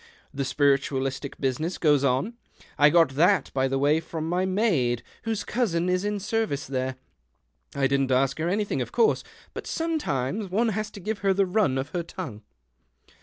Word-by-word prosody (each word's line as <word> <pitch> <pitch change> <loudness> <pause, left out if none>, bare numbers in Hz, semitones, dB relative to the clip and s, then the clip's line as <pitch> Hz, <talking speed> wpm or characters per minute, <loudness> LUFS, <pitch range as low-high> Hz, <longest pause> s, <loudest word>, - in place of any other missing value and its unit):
The 140 0 -2
spiritualistic 140 -1 0
business 145 +6 -1
goes 145 -4 +3
on. 140 - +1 0.4
I 145 +1 +6
got 165 -1 +5
that, 165 +4 +2
by 135 0 +1
the 135 +1 -1
way, 145 +3 +3
from 160 -1 -5
my 180 +2 0
maid, 170 - +1 0.2
whose 225 -2 -1
cousin 180 -8 0
is 180 +1 +1
in 205 0 -1
service 210 -8 -1
there. 130 0 -2 0.8
I 140 - +1
didn't 135 -1 +1
ask 135 +2 +2
her 165 +2 0
anything, 205 +2 -1
of - - -4
course, 445 -2 +2 0.3
but - - -7
some 330 -1 -1
times 165 - -2
one 225 +5 +1
has 215 0 -2
to 205 - -11
give 210 +2 -3
her 195 -1 +2
the 195 0 +3
run 180 -8 +1
of 135 +2 -3
her 175 - -2
tongue." 165 - -7
165 Hz, 180 wpm, -26 LUFS, 135-200 Hz, 0.8 s, I